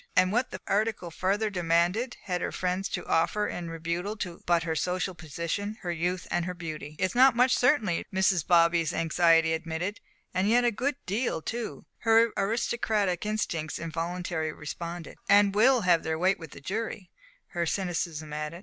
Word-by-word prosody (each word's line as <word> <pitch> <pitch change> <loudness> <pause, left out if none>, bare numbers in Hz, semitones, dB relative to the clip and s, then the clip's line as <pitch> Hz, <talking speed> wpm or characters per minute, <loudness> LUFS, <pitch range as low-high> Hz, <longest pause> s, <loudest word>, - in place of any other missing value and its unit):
And 185 0 +4
what, 245 +4 +1
the 185 - -7
article 205 -4 0
further 205 +5 0
demanded, 175 +7 +1
had 180 -2 -2
her - - -2
friends 185 +1 -2
to - - -4
offer 170 +6 +1
in 170 -1 -5
rebuttal 170 +6 -3 0.3
but 170 -1 +3
her 165 -1 -2
social 180 +3 -1
position, 170 +6 -4
her 175 - -2
youth 175 +2 -2
and 175 - 0
her 180 0 -4
beauty? 155 -3 -7
"It's 185 +3 0
not 255 0 +6
much, 250 +2 +4
certainly," 240 - +2
Mrs. 190 -4 +2
Bobby's 170 -1 +4
anxiety 165 0 +3
admitted. 165 +5 -3 0.3
"And 185 +3 +1
yet 245 +2 +4
a 240 - +4
good 260 +6 -1
deal, 210 -2 -1
too," 230 +7 -5
her 225 0 +4
aristocratic 210 -2 0
instincts 170 -7 -2
involuntarily 165 -1 -3
responded; 170 +2 -7
"and 200 0 +6
will 245 +4 +5
have 175 -4 +4
their 160 0 -2
weight 190 +4 +2
with 165 -2 -9
the - - -12
jury," 200 +1 -4 0.4
her 170 -2 -2
cynicism 165 -5 -2
added. 150 +3 -4
180 Hz, 165 wpm, -28 LUFS, 165-210 Hz, 0.4 s, not